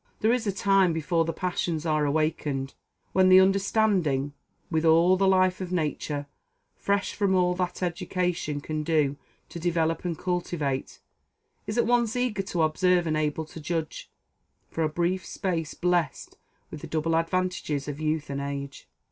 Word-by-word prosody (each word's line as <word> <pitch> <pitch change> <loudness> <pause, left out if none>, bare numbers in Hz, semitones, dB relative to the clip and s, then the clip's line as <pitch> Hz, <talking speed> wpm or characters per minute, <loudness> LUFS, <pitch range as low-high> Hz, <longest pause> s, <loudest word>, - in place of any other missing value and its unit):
There 220 +2 +4
is 240 -3 -1
a - - +2
time, 195 -2 +3
before 165 +1 0
the 165 - -1
passions 170 -2 -2
are 155 -2 +1
awakened, 145 -2 -1 0.4
when 185 0 +5
the 185 0 +9
understanding, 190 -7 +2 0.4
with 160 -1 +1
all 165 +3 +5
the 195 +1 +2
life 185 -1 +3
of 180 -1 -5
nature, 150 -3 -2 0.5
fresh 200 0 -1
from 200 -2 +1
all 180 -1 +3
that 180 0 -3
education 175 -3 -2
can 155 +1 -3
do 150 -3 +1 0.3
to 170 - -7
develop 165 -1 0
and 170 -3 -2
cultivate, 165 -7 -3 0.7
is 215 - -3
at 235 - +3
once 240 -1 +2
eager 245 -5 0
to 180 -4 -1
observe 175 +3 +2
and 155 -1 0
able 155 +1 -1
to 160 +1 -10
judge, 160 0 -4 0.6
for 165 - -1
a 155 - +1
brief 175 +3 -1
space 170 -6 -3
blessed 175 -5 -1 0.4
with 155 - -8
the - - -7
double 160 +1 0
advantages 165 -4 -1
of 145 0 -5
youth 155 -1 -1
and 140 0 -3
age. 140 0 -6
170 Hz, 165 wpm, -26 LUFS, 155-185 Hz, 0.7 s, the